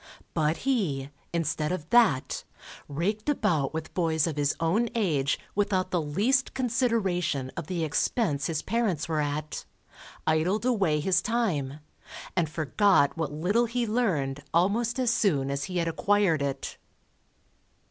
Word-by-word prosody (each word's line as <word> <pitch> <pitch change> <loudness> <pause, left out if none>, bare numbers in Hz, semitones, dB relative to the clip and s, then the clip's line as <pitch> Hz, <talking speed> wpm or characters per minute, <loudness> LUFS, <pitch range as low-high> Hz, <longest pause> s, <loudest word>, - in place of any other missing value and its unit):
But 155 0 +1
he, 155 - 0 0.2
instead 155 -2 -1
of 160 -4 -3
that, 225 - +3 0.4
raked 205 - -2
about 160 - +1
with 160 0 -5
boys 160 -3 +1
of 165 -4 -2
his 145 -1 +1
own 205 +9 +1
age, 150 -11 +1 0.2
without 195 -2 0
the 175 - +1
least 210 - +1
consideration 220 - 0
of 170 -3 -5
the 175 -3 -2
expense 150 - 0
his 160 -2 -2
parents 205 -8 0
were 160 -2 0
at, 150 +1 -3 0.6
idled 170 +8 +1
away 190 -12 +2
his 185 +4 +2
time, 155 - -1 0.5
and 170 -4 +1
forgot 155 0 +3
what 160 -3 -2
little 185 +11 +1
he 235 +1 -1
learned 170 - 0
almost 220 +8 +2
as 250 -2 +2
soon 140 -12 +1
as 140 0 -2
he 185 - -4
had 170 -1 +1
acquired 185 -2 +2
it. 140 -1 -3
170 Hz, 140 wpm, -27 LUFS, 150-215 Hz, 0.6 s, that